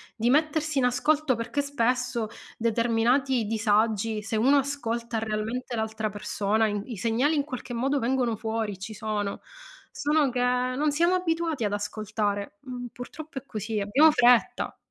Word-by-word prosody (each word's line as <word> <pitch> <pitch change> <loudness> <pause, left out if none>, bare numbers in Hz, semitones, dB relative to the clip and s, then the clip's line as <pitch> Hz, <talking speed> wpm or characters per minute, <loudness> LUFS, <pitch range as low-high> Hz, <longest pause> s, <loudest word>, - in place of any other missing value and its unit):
di 235 +1 +1
mettersi 310 0 +2
in 255 - +3
ascolto 285 +2 +2
perché 230 +5 -2
spesso, 250 -4 0 0.3
determinati 235 +2 +2
disagi, 215 0 +1
se 220 +1 -2
uno 265 +6 +5
ascolta 240 -5 -2
realmente 225 +3 -3
l'altra 220 -1 -2
persona, 210 +1 0
i 205 -1 -2
i 235 -5 -7
segnali 235 +9 +1
in 290 - +1
qualche 255 -3 -7
modo 270 +4 +1
vengono 245 -1 +1
fuori, 220 -3 -3
ci 210 +3 -6
sono. 205 -2 -3 0.5
Solo 295 -1 +2
che, 250 - -2
non 255 +4 +1
siamo 340 +5 +2
abituati 330 -6 0
ad 205 -1 0
ascoltare, 210 +3 -3
mhmm, 250 -2 -6
purtroppo 275 +5 -9
è 265 - -4
così, 215 -2 -3
abbiamo 255 +11 +5
fretta. 245 -4 +3
240 Hz, 150 wpm, -27 LUFS, 220-275 Hz, 0.5 s, uno